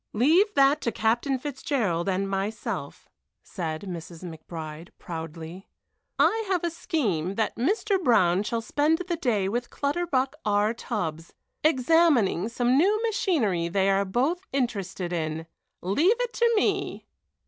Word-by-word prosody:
"Leave 325 - +4
that 280 +2 +4
to 235 - -1
Captain 235 +6 +1
Fitzgerald 250 - -1
and 195 +1 0
myself," 195 +2 -4 0.4
Mrs. 170 -1 -6
McBride 160 -1 -8
said, - - -29
proudly. 165 +2 -7 0.5
"I 450 0 +3
have 370 -3 0
a 340 - 0
scheme 200 - -1
that 220 - -1
Mr. 385 - 0
Brown 185 - +4
shall 230 +2 -2
spend 295 +7 +2
the 345 - 0
day 235 - 0
with 240 +4 -2
Clutterbuck 280 -3 -1
R. 210 +1 +2
Tubbs, 165 -9 -4 0.3
examining 265 - +3
some 245 +3 +2
new 405 +6 +3
machinery 275 - +1
they 195 +2 +2
are 195 +1 +2
both 275 - -1
interested 195 -9 -2
in. 160 -1 -2 0.4
Leave 320 - +2
it - - -2
to 470 0 +3
me!" 415 - 0
230 Hz, 135 wpm, -26 LUFS, 180-305 Hz, 0.5 s, Leave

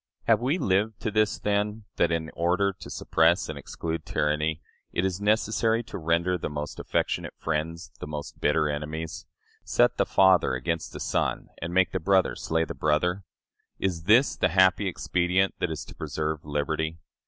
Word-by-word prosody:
Have 115 -2 +4
we 135 +7 +1
lived 105 - +1
to 110 - -1
this, 110 0 +2
then, 105 +1 -1
that, 85 - +3
in 80 -1 -2
order 90 +4 +1
to 95 - -11
suppress 80 +3 +2
and 80 - -5
exclude 80 +3 -5
tyranny, 75 +1 0 0.3
it 90 - 0
is 95 0 -2
necessary 110 +2 +2
to 115 - -7
render 85 +2 +1
the - - -3
most 75 0 -5
affectionate - - -1
friends 80 +2 -3
the - - -6
most 75 -1 -7
bitter 75 - +2
enemies, 75 +2 -4 0.4
set - - +2
the - - +2
father 95 -8 +4
against 80 +5 -2
the - - -8
son, - - -1
and 85 - -3
make 90 0 +3
the 95 - -1
brother 95 +2 +2
slay 80 0 0
the - - -6
brother? 90 +5 0 0.5
Is 85 -4 -2
this 115 +7 +5
the 90 - +2
happy 95 +3 +4
expedient 90 +1 +1
that - - 0
is 80 - -5
to - - -11
preserve 75 -1 -3
liberty? 80 +2 -2
85 Hz, 175 wpm, -27 LUFS, 80-95 Hz, 0.5 s, this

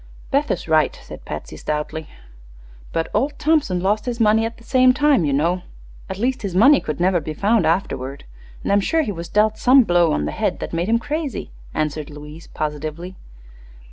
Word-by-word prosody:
"Beth 285 +2 +1
is 175 - -2
right," 155 -1 +2
said - - -11
Patsy, - - -7
stoutly. 150 +1 -4 0.8
"But 165 - -2
old 285 +2 0
Thompson 300 - +1
lost 210 +5 0
his 240 -1 -3
money 220 0 +4
at 230 - -10
the - - -17
same 255 +1 +4
time, 290 - +3
you 145 - 0
know; 170 +6 +1 0.5
at 190 - -5
least 255 +5 -1
his 195 -4 -4
money 270 +9 +6
could 155 0 -4
never 180 0 +3
be 155 -1 -6
found 205 -2 +2
afterward. 140 -6 -2 0.4
And - - -1
I'm 200 0 +4
sure 320 +9 +1
he 215 - -3
was 170 -2 -7
dealt 215 +1 +2
some 260 +1 +6
blow 175 -5 +3
on 75 - 0
the 75 - -2
head - - -1
that - - -6
made 170 +4 -1
him 230 - +4
crazy," 290 - -4 0.2
answered 155 -1 -2
Louise, 150 +2 -11
positively. 155 +4 -5
190 Hz, 195 wpm, -21 LUFS, 155-240 Hz, 0.8 s, money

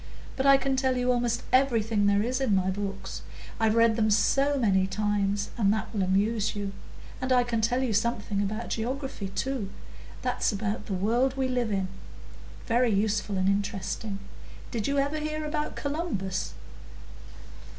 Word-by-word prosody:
But 270 +1 +1
I 275 0 +8
can 270 0 0
tell 260 -1 +1
you 250 0 +2
almost 240 -1 0
everything 225 -6 +3
there 200 0 +3
is 255 +3 -1
in 230 -7 +2
my 190 0 +2
books, 195 0 -5 0.4
I've 220 -1 +3
read 230 -1 +5
them 220 -1 +3
so 275 +7 +3
many 190 -6 +3
times, 205 0 0
and 200 -3 +4
that 215 +2 -2
will 205 - 0
amuse 200 +4 +1
you. 200 -1 -3 0.5
And 255 0 -2
I 250 -1 +5
can 235 -2 -1
tell 245 +4 +1
you 240 -4 0
something 210 -2 0
about 215 +3 -3
Geography 255 -2 -3
too,—that's 210 +1 -3
about 210 +1 -3
the 195 - -2
world 240 +8 +1
we 265 -1 +1
live 245 -3 0
in,—very 200 +5 -3
useful 210 -1 0
and 185 0 +1
interesting. 200 +1 -1 0.5
Did 225 -4 -2
you 280 0 0
ever 285 +2 +1
hear 305 0 -3
about 300 0 -2
Columbus?" 280 - -3
220 Hz, 160 wpm, -28 LUFS, 200-255 Hz, 0.5 s, I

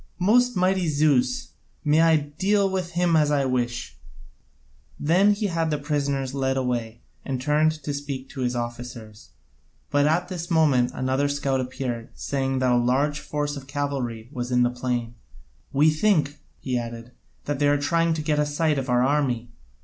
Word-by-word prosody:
Most 245 +7 +3
mighty 185 -1 +2
Zeus, 150 - +1 0.4
may 150 +2 +4
I 165 -1 +5
deal 190 +8 +1
with 185 -2 -3
him 175 -1 +2
as 150 -2 +4
I 145 -2 +2
wish!" 120 - -2 1.0
Then 185 +7 +4
he 210 +1 -2
had 165 -4 0
the 150 - 0
prisoners 140 -2 -2
led 135 -1 0
away 120 -3 -2 0.2
and 135 -2 -3
turned 150 +3 +2
to 145 - -3
speak 140 -2 -5
to 135 - -7
his 125 0 0
officers, 120 -2 -7 0.6
but 145 0 +3
at 170 +3 +1
this 175 -2 -5
moment 145 -7 +3
another 130 +2 0
scout 140 -2 0
appeared, 125 -2 -4
saying 135 -1 -2
that 130 -1 +2
a 120 - +4
large 135 +5 +1
force 145 -1 -3
of 135 -1 -9
cavalry 135 -5 -3
was 125 -3 -4
in 125 0 +4
the 120 - +2
plain. 120 -1 -3 0.6
"We 150 +3 +4
think," 155 -4 +1 0.2
he 125 -2 -1
added, 115 0 -7 0.3
"that 145 -2 -2
they 145 - +3
are 145 0 +3
trying 165 +3 +1
to 155 - -3
get 150 -1 +1
a 150 - +3
sight 150 0 +1
of 130 -1 -5
our 125 0 +3
army. 130 -5 0
145 Hz, 175 wpm, -24 LUFS, 125-155 Hz, 1.0 s, I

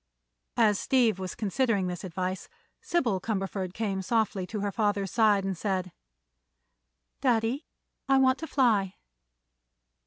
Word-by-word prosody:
As 215 -4 +4
Steve 235 -7 +2
was 185 -1 -5
considering 220 -2 0
this 180 0 -4
advice 185 +1 -4 0.3
Sybil 335 - 0
Cumberford 195 -3 -3
came 200 -3 -2
softly 200 -3 0
to 210 0 -4
her 205 0 -1
father's 205 -2 0
side 215 -3 +3
and 195 -1 -1
said: 185 -1 -2 1.3
"Daddy, 245 +2 +1 0.4
I 270 - +5
want 260 0 +4
to 320 - -5
fly." 215 -10 +2
205 Hz, 125 wpm, -28 LUFS, 190-235 Hz, 1.3 s, I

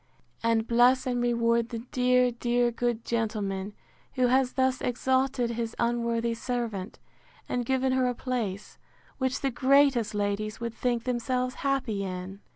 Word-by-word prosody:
—And 230 -1 +2
bless 245 +2 +4
and 245 -1 0
reward 235 -1 +1
the 230 - -4
dear, 250 0 +3
dear, 240 0 +1
good 235 -1 -2
gentleman, 210 -3 -2 0.4
who 255 -1 +2
has 260 0 +2
thus 260 -1 +1
exalted 260 0 0
his 230 -1 -3
unworthy 235 -1 0
servant, 230 -4 -4 0.5
and 245 -1 -2
given 265 0 +1
her 260 -1 +2
a 245 - -1
place, 225 -6 -4 0.4
which 260 0 -1
the 275 - 0
greatest 265 -3 +3
ladies 205 +1 -2
would 235 -1 -4
think 240 -1 -1
themselves 250 0 -1
happy 265 -7 0
in! 185 +1 -6
240 Hz, 145 wpm, -28 LUFS, 230-255 Hz, 0.5 s, bless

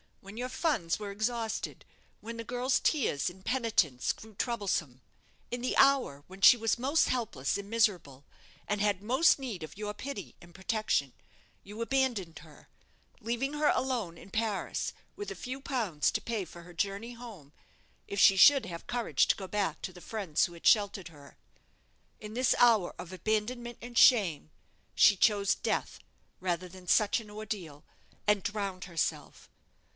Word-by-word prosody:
When 200 +3 -12
your 250 +1 -3
funds 255 - 0
were 205 -1 -6
exhausted, 225 +2 -3 0.4
when 230 +1 -7
the 230 - -5
girl's 250 +3 0
tears 180 - +1
and 185 +1 -15
penitence 225 - +1
grew 220 0 -14
troublesome 190 - -2 0.5
in 245 0 -3
the 255 - -1
hour 270 - +3
when 190 +1 -13
she 240 +5 +9
was 225 +1 0
most 280 +6 +2
helpless 215 - -1
and 200 0 -8
miserable, 180 - 0 0.4
and 205 0 -1
had 205 -2 +1
most 260 +9 +4
need 245 -10 -6
of 155 +4 -9
your 210 0 -4
pity 210 -3 -7
and 175 -1 -16
protection, 190 - -1 0.5
you 210 +3 -9
abandoned 230 -9 -1
her, - - -17 0.5
leaving 240 +5 -2
her 300 0 +1
alone 235 -10 -1
in 195 - -14
Paris, 220 -3 -2 0.2
with 410 0 -6
a - - -6
few 255 +1 -6
pounds 225 - 0
to - - -2
pay 220 -5 -3
for 170 +1 -12
her 175 +1 -13
journey 200 +6 -3
home, 220 - -11 0.6
if 200 - -4
she 195 -1 +7
should 275 +9 +7
have 170 -1 -8
courage 240 -1 +1
to - - +3
go 190 - -7
back 195 -6 -2
to 185 - -5
the 180 - -13
friends 195 -9 0
who 175 - -8
had 170 - -14
sheltered 200 -4 +3
her. 145 -3 -16 0.8
In 210 0 -9
this 255 0 +3
hour 225 -7 +4
of 180 - -8
abandonment 220 +5 -2
and 240 0 -7
shame, 190 - +5 0.5
she 205 - +6
chose 200 0 +3
death - - -2 0.4
rather 180 -1 -2
than 185 0 -14
such 210 +5 +3
an 220 -2 -12
ordeal, 200 -8 -6 0.4
and 210 -1 +3
drowned 200 -2 -4
herself." 170 -3 -3
210 Hz, 165 wpm, -30 LUFS, 180-240 Hz, 0.8 s, she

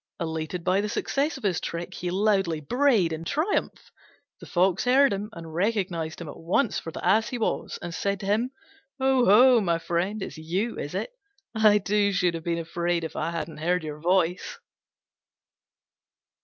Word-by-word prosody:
Elated 160 +1 -3
by 185 +2 +2
the 210 - -3
success 280 +6 -1
of 270 - -13
his 190 -5 0
trick, 170 +2 -5
he 180 - -4
loudly 195 -4 +1
brayed 215 - +2
in 160 +1 -5
triumph. 310 - -2 0.5
The - - -11
Fox 185 +3 +1
heard 265 0 +5
him, 200 +2 -4
and 165 -2 -9
recognised 180 -4 -1
him 170 - -7
at 145 - -9
once 190 +8 +1
for 165 - -7
the - - -7
Ass 215 +5 +3
he 250 - -3
was, 225 - -2
and 175 -1 -5
said 200 +3 -1
to - - -6
him, 215 +5 +1 0.5
"Oho, 255 -2 +5
my 170 -4 +1
friend, 180 +5 -2
it's - - -7
you, 185 +9 -2
is - - -5
it? - - -3 0.4
I, 215 -2 +5
too, 205 0 +1
should 180 -3 +2
have 165 -1 -5
been 170 0 -1
afraid 170 +1 -1
if 160 - -6
I 155 - -1
hadn't 165 -1 -5
heard 175 +3 0
your 150 -1 -6
voice." 180 +1 0
185 Hz, 180 wpm, -26 LUFS, 170-215 Hz, 0.5 s, heard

